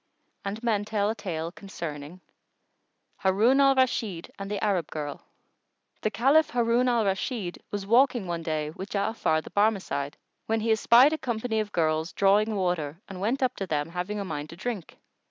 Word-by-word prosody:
And 205 +4 -5
men 215 -4 +1
tell 210 -1 0
a - - -4
tale 165 -6 -4
concerning 170 -4 -7 1.0
HARUN 220 +8 +3
AL 275 -1 +5
RASHID 225 -9 0
AND 195 0 -5
THE 205 -1 -2
ARAB 190 -7 0
GIRL. 145 -2 -5 0.8
The 215 - +1
Caliph 275 +8 +4
Harun 240 +1 +2
al 235 -3 +2
Rashid 195 -1 -2
was 205 -1 -4
walking 245 0 +4
one 170 -1 -3
day 155 -2 -2
with 190 +5 -8
Ja'afar 200 -6 0
the - - -11
Barmecide, 195 -9 0 0.3
when 225 0 +1
he 225 +1 +1
espied 235 +6 +6
a 315 - -2
company 230 -2 -1
of 210 -1 -2
girls 160 0 0
drawing 210 +2 +3
water 175 -5 -1
and 190 -2 -8
went 245 +7 0
up 255 -1 +1
to 195 - -3
them, 150 -2 -1
having 180 +4 -3
a 200 - -3
mind 150 -4 -5
to 165 - -9
drink. 205 -1 -5
200 Hz, 175 wpm, -27 LUFS, 170-230 Hz, 1.0 s, espied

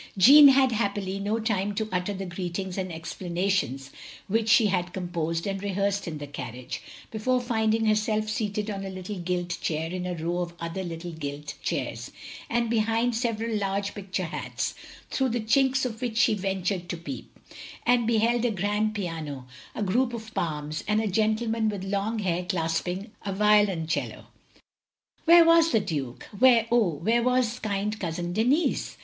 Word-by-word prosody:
Jeanne 285 +9 +10
had, 265 -1 +5
happily, 200 -3 -1
no 210 +3 -1
time 205 -2 -1
to 220 +1 -1
utter 180 +2 -1
the 195 -1 -4
greetings 180 +1 -4
and 185 -2 -3
explanations 170 -4 -2 0.4
which 225 +2 +1
she 225 0 +6
had 180 -3 0
com 185 -2 -4
posed 165 -1 -2
and 195 -1 -3
rehearsed 200 0 -1
in 160 -2 -4
the 145 - -6
carriage, 125 -3 -7 0.3
before 250 +4 +1
finding 225 -2 +1
herself 215 0 +1
seated 210 0 -2
on 195 -1 -4
a 195 - -5
little 185 +1 -6
gilt 175 0 -2
chair 160 +1 -2
in 180 0 -3
a 180 - -2
row 170 +2 -2
of 175 -1 -4
other 170 +3 -4
little 170 0 -6
gilt 145 -2 -6
chairs, - - -3 0.4
and 235 0 +1
behind 225 +1 +1
several 230 -1 -1
large 200 -1 -1
picture 190 -2 -4
hats, 160 - -3 0.4
through 265 -1 +1
the 240 +1 -1
chinks 265 +4 +2
of 225 -1 -5
which 235 -3 -2
she 245 -3 +4
ventured 190 -2 -2
to 175 - -3
peep; 170 +11 -8 0.5
and 240 -1 +3
beheld 230 +1 +2
a 245 - +3
grand 210 +2 0
piano, 160 -9 -4 0.3
a 215 - -2
group 240 +5 +1
of 220 -1 -9
palms, 150 -2 -3
and 210 +1 +2
a 220 - 0
gentleman 220 +2 +1
with 200 -3 -4
long 200 +3 -1
hair 180 -4 -1
clasping 180 +4 -2
a 200 - -3
violoncello. 195 -5 +2 1.0
Where 340 0 +8
was 330 0 +6
the 225 - +4
Duke? 140 -10 -4 0.2
Where, 240 -3 +6
oh, 235 -6 +4
where 225 +10 +1
was 250 -1 +1
kind 210 +1 -2
Cousin 175 0 -3
Denis? 250 - +1
200 Hz, 170 wpm, -27 LUFS, 175-225 Hz, 1.0 s, Jeanne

